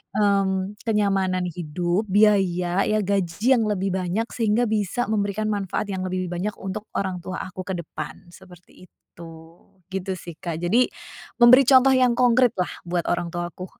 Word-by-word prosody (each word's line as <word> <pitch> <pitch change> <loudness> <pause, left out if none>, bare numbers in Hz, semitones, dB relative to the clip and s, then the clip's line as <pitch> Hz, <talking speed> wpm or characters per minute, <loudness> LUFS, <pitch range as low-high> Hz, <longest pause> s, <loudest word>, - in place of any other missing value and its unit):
mmm, 195 -1 +1
kenyamanan 195 -4 0
hidup, 175 +3 -2
biaya, 190 -3 +3
ya, 215 0 +1
gaji 200 +5 +1
yang 230 - +1
lebih 195 -2 -1
banyak, 190 +5 -1
sehingga 230 +1 +1
bisa 215 +2 -1
memberikan 215 0 -1
manfaat 200 0 -2
yang 190 -1 -3
lebih 185 0 -3
banyak 185 +4 -2
untuk 195 +2 -5 0.2
orang 190 -2 -3
tua 185 - -5
aku 185 0 -7
ke 190 -2 -3
depan, 170 +1 -8
seperti 180 -1 -17
itu, 165 -1 -14 0.6
gitu, 190 0 -3
sih, 170 -2 -10
Kak. 170 -3 -4
Jadi 230 +9 +3 0.5
memberi 245 +3 +8
contoh 265 0 +6
yang 250 -2 +3
konkrit, 250 -1 +4
lah, 180 - -1
buat 175 0 -2
orang 175 -1 -1
tuaku. 175 +1 -5
195 Hz, 155 wpm, -23 LUFS, 180-215 Hz, 0.6 s, memberi